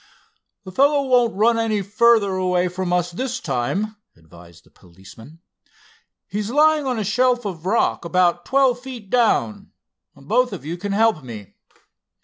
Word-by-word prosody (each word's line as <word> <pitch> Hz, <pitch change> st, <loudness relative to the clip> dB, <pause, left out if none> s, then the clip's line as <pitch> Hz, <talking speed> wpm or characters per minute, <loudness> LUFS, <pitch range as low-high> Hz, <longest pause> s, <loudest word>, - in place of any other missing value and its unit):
"The 190 Hz, -, -10 dB
fellow 280 Hz, +7 st, +2 dB
won't 245 Hz, -4 st, +2 dB
run 230 Hz, +3 st, +2 dB
any 215 Hz, -3 st, -1 dB
further 215 Hz, 0 st, +3 dB
away 180 Hz, -1 st, 0 dB
from 180 Hz, 0 st, -4 dB
us 175 Hz, 0 st, 0 dB
this 255 Hz, +7 st, -4 dB
time," 205 Hz, -, -3 dB, 0.2 s
advised 85 Hz, +1 st, -18 dB
the -, -, -26 dB
policeman. 100 Hz, -, -16 dB, 0.9 s
"He's 205 Hz, +2 st, -4 dB
lying 300 Hz, +2 st, +3 dB
on 250 Hz, -2 st, -1 dB
a 215 Hz, -, -2 dB
shelf 245 Hz, +3 st, +1 dB
of 180 Hz, -3 st, -6 dB
rock 225 Hz, +4 st, +1 dB
about 175 Hz, 0 st, +1 dB
twelve 265 Hz, 0 st, +2 dB
feet 245 Hz, -6 st, -10 dB
down. 220 Hz, -, +1 dB, 0.5 s
Both 230 Hz, -, 0 dB
of 175 Hz, -, -8 dB
you 165 Hz, +3 st, -4 dB
can 200 Hz, +3 st, -5 dB
help 220 Hz, -7 st, +2 dB
me." 110 Hz, -5 st, -10 dB
200 Hz, 150 wpm, -21 LUFS, 175-240 Hz, 0.9 s, further